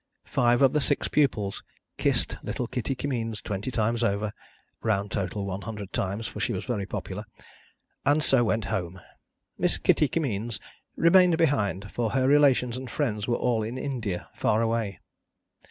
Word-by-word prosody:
Five 120 Hz, +2 st, +3 dB
of 135 Hz, -, +5 dB
the 150 Hz, -, +2 dB
six 145 Hz, +1 st, 0 dB
pupils 110 Hz, -9 st, +1 dB, 0.4 s
kissed -, -, +1 dB
little 125 Hz, -, -3 dB
Kitty 125 Hz, +2 st, -2 dB
Kimmeens 115 Hz, -6 st, -2 dB
twenty 100 Hz, +3 st, -4 dB
times 115 Hz, 0 st, 0 dB
over 105 Hz, -1 st, 0 dB, 0.5 s
(round 100 Hz, -2 st, 0 dB
total, 100 Hz, +1 st, -2 dB
one 95 Hz, 0 st, -4 dB
hundred 105 Hz, -4 st, -7 dB
times, 100 Hz, +4 st, -2 dB
for 105 Hz, -, -6 dB
she 105 Hz, -, 0 dB
was -, -, -4 dB
very 105 Hz, -6 st, -2 dB
popular), 100 Hz, 0 st, -5 dB, 0.8 s
and 145 Hz, +1 st, +3 dB
so 135 Hz, -4 st, +4 dB
went 110 Hz, -2 st, 0 dB
home. 90 Hz, 0 st, -3 dB, 0.6 s
Miss -, -, +1 dB
Kitty 150 Hz, -, +3 dB
Kimmeens 120 Hz, -8 st, -2 dB, 0.4 s
remained 175 Hz, 0 st, +5 dB
behind, 105 Hz, -, +1 dB
for 120 Hz, -2 st, -1 dB
her 130 Hz, -1 st, +2 dB
relations 135 Hz, -4 st, +4 dB
and 130 Hz, -1 st, -6 dB
friends 110 Hz, -7 st, -1 dB
were 120 Hz, -, +2 dB
all 120 Hz, -2 st, +1 dB
in 115 Hz, +4 st, -4 dB
India, 115 Hz, -10 st, -3 dB
far 110 Hz, +2 st, +1 dB
away. 115 Hz, -4 st, -1 dB
115 Hz, 160 wpm, -27 LUFS, 105-130 Hz, 0.8 s, of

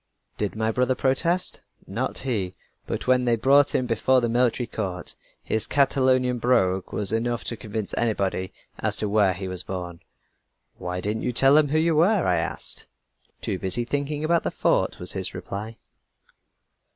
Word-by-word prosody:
"Did 105 Hz, -1 st, -2 dB
my 110 Hz, 0 st, 0 dB
brother 125 Hz, +2 st, +1 dB
protest? 170 Hz, +8 st, +1 dB, 0.2 s
Not 115 Hz, +7 st, -3 dB
he. 105 Hz, -9 st, -2 dB, 0.3 s
But -, -, -3 dB
when 125 Hz, -1 st, +3 dB
they 120 Hz, -1 st, +3 dB
brought 140 Hz, +5 st, +4 dB
him 130 Hz, -, +1 dB
before 125 Hz, +2 st, +2 dB
the 120 Hz, -, 0 dB
military 120 Hz, +1 st, +2 dB
court, 95 Hz, -6 st, -4 dB, 0.3 s
his 110 Hz, -, -1 dB
Catalonian 130 Hz, -3 st, +2 dB
brogue 95 Hz, -7 st, +1 dB
was 100 Hz, -2 st, -1 dB
enough 120 Hz, +1 st, -1 dB
to 115 Hz, -, -3 dB
convince 110 Hz, -1 st, -5 dB
anybody 100 Hz, -5 st, -1 dB, 0.3 s
as -, -, +1 dB
to 105 Hz, -, 0 dB
where 100 Hz, -3 st, +3 dB
he 95 Hz, +1 st, -5 dB
was 90 Hz, -1 st, -1 dB
born. 90 Hz, -2 st, -6 dB, 0.8 s
"'Why 90 Hz, 0 st, -4 dB
didn't 105 Hz, +3 st, -2 dB
you 125 Hz, -, -1 dB
tell 135 Hz, +3 st, +5 dB
them 150 Hz, 0 st, +5 dB
who 150 Hz, +3 st, 0 dB
you 160 Hz, 0 st, +2 dB
were?' 180 Hz, +4 st, +3 dB
I 90 Hz, -1 st, +2 dB
asked 80 Hz, -, -2 dB
him. -, -, -9 dB, 0.5 s
"'Too 95 Hz, -, -2 dB
busy 100 Hz, +6 st, 0 dB
thinking 145 Hz, +3 st, -2 dB
about 170 Hz, +1 st, +2 dB
the -, -, -2 dB
fort,' -, -, +1 dB
was -, -, -1 dB
his -, -, -2 dB
reply." 110 Hz, +3 st, -6 dB
120 Hz, 175 wpm, -25 LUFS, 100-130 Hz, 0.8 s, tell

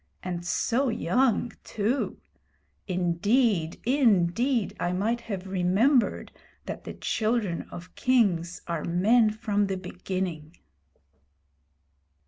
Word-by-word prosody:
And 175 Hz, -1 st, -4 dB
so 245 Hz, +9 st, +1 dB
young 240 Hz, 0 st, +1 dB
too! 225 Hz, +6 st, -1 dB, 0.7 s
Indeed, 185 Hz, +1 st, +1 dB
indeed, 235 Hz, -1 st, +2 dB
I 175 Hz, -, 0 dB
might 225 Hz, +6 st, 0 dB
have 200 Hz, -5 st, -5 dB
remembered 195 Hz, +8 st, +2 dB, 0.3 s
that -, -, -6 dB
the -, -, -7 dB
children 215 Hz, -6 st, -1 dB
of 180 Hz, +1 st, -10 dB
kings 190 Hz, -10 st, +1 dB
are 170 Hz, -3 st, -3 dB
men 215 Hz, +7 st, +3 dB
from 205 Hz, -1 st, 0 dB
the 190 Hz, -1 st, -2 dB
beginning.' 180 Hz, -3 st, -5 dB
200 Hz, 100 wpm, -27 LUFS, 180-235 Hz, 0.7 s, men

